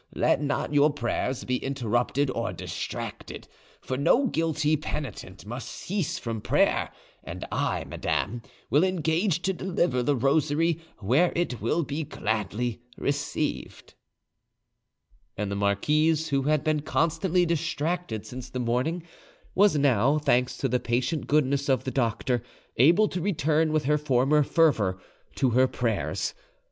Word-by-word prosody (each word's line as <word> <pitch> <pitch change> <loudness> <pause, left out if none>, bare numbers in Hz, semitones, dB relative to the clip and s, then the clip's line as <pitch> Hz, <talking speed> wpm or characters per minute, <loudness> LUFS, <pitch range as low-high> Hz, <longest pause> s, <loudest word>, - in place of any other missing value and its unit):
Let - - +2
not 145 0 -1
your 145 +1 +5
prayers 130 -1 -2
be 125 0 0
interrupted 130 +1 0
or 115 -2 -2
distracted, - - -6 0.3
for 130 - -3
no 235 - +3
guilty 160 - +1
penitent 140 -11 -6
must 120 +4 -6
cease 180 -3 -3
from 115 -2 -4
prayer; - - +2 0.3
and - - -6
I, - - -1
madame, 115 +4 -2 0.3
will 150 +4 +5
engage 175 0 +1
to 190 - +1
deliver 175 -8 0
the 140 +4 +1
rosary 155 +5 +2 0.2
where 130 - +2
it 170 -9 -1
will 155 +10 +1
be 145 +3 -3
gladly 110 -1 -2 0.2
received." 145 +1 -3 1.4
And 105 -1 -2
the - - -1
marquise, 150 +11 +1
who 140 -1 +1
had 150 +1 +1
been 155 -1 +1
constantly 165 +4 +1
distracted 165 -7 -2
since 125 +3 -8
the 125 - -6
morning, 125 +8 -1 0.5
was 200 -5 +4
now, 140 0 +3
thanks 125 -4 +1
to 135 - 0
the 125 0 +1
patient 125 +7 -1
goodness 140 -1 +1
of 130 - +2
the 130 - -3
doctor, 120 -1 0 0.4
able 170 - +5
to 180 - -3
return 160 -3 +1
with 155 -2 0
her 150 +2 +2
former 140 +1 +3
fervour 135 - +2 0.4
to 130 -3 +2
her 130 +2 +4
prayers. 115 -5 -2
145 Hz, 140 wpm, -26 LUFS, 125-160 Hz, 1.4 s, your